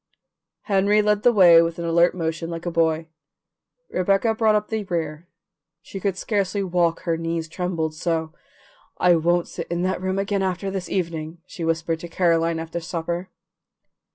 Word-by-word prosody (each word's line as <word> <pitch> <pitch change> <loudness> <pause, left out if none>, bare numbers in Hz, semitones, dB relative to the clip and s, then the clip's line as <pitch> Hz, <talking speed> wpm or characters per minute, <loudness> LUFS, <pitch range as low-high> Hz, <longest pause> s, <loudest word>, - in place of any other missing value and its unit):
Henry 205 +1 +3
led 210 0 +2
the 245 - +5
way 175 -6 +7
with 165 0 -1
an 170 - -4
alert 170 +2 +3
motion 165 -1 -3
like 165 0 -6
a 175 - -1
boy; 160 -1 +1 0.8
Rebecca 195 +5 +2
brought 220 -1 +3
up 210 0 -1
the 220 -1 -2
rear; 165 -2 -3 0.6
she 195 - -8
could 195 -1 -1
scarcely 200 -1 -1
walk, 175 -2 +1
her 165 -2 -1
knees 165 0 -3
trembled 165 -2 -2
so. 160 0 -2 0.6
"I 180 - +4
can't 175 +1 +2
sit - - -6
in 175 +1 -2
that 185 0 -1
room 190 +1 -1
again 200 0 0
this 190 0 -2
evening," 165 -3 -3
she 170 - -8
whispered 165 0 -1
to 175 - -7
Caroline 165 -1 +1
after 165 +1 -4
supper. 170 +1 -4
175 Hz, 165 wpm, -23 LUFS, 165-190 Hz, 0.8 s, way